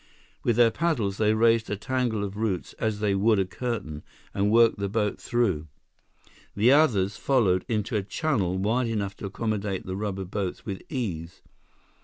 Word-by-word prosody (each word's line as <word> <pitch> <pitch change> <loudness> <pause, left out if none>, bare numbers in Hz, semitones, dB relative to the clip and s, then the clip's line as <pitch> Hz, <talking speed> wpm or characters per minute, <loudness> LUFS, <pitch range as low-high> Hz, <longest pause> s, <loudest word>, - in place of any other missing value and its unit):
With 120 - +2
their 120 -1 +5
paddles, 110 - 0
they 110 0 +3
raised 115 0 +3
a 105 - -2
tangle 120 -2 -1
of 100 0 -5
roots 105 -4 -2
as 110 -2 -1
they 105 -2 +2
would 105 +3 +3
a 95 - +2
curtain, 95 -8 -4 0.3
and 100 +1 +1
worked 115 -1 +4
the 100 0 -1
boat 105 0 -1
through. 95 -11 0 0.9
The 110 +5 +4
others 110 -10 +3
followed 105 -10 +2
into 110 -2 -1
a 105 - +2
channel 100 - -1
wide 115 +6 +1
enough 100 -4 -2
to 100 - -5
accommodate 100 -2 -3
the 95 - -4
rubber 100 -1 -3
boats 95 0 -4
with 100 -3 -5
ease. 90 - -4
105 Hz, 170 wpm, -26 LUFS, 95-115 Hz, 0.9 s, their